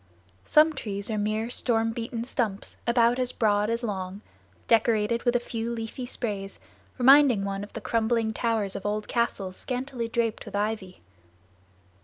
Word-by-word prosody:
Some 310 +1 +5
trees 205 -5 -4
are 215 - -1
mere 215 +3 -1
storm 225 -2 +1
beaten 230 0 -4
stumps 230 -5 -3
about 235 +1 +3
as 250 -1 0
broad 210 -3 +1
as 230 +1 -1
long, 195 -2 -4 0.5
decorated 225 0 +3
with 240 0 +2
a - - +4
few 230 -1 -4
leafy 235 +2 -5
sprays, 200 -6 -4 0.4
reminding 260 -5 +6
one 195 0 -3
of 205 - -10
the 225 - -6
crumbling 225 0 0
towers 220 -4 0
of - - -5
old 210 +1 -2
castles 195 -6 -1
scantily 250 -2 -3
draped 230 -1 -1
with 205 - -8
ivy. 205 -3 -3
225 Hz, 155 wpm, -27 LUFS, 205-240 Hz, 0.5 s, reminding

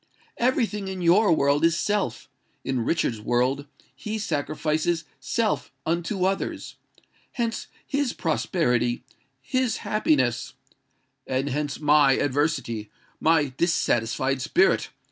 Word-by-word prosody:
Every 250 0 +3
thing 210 -2 -5
in 190 -2 -4
your 180 +4 +5
world 140 -1 +3
is 165 0 +4
SELF: 205 +1 -1 0.4
in 130 -3 -1
Richard's 115 -7 0
world 125 +5 0 0.3
he 215 +1 -4
sacrifices 155 -1 -1
SELF 230 -2 -1
unto 175 +3 0
others. 195 +1 -2 0.6
Hence 230 -2 -2 0.2
his 280 -3 0
prosperity—his 135 - -1
happiness——" 130 - +1 0.7
"And 130 +2 -1
hence 145 +1 -2
my 150 -2 +5
adversity—my 145 +1 0
dissatisfied 130 -5 +1
spirit!" 355 - +2
155 Hz, 100 wpm, -25 LUFS, 135-190 Hz, 0.7 s, your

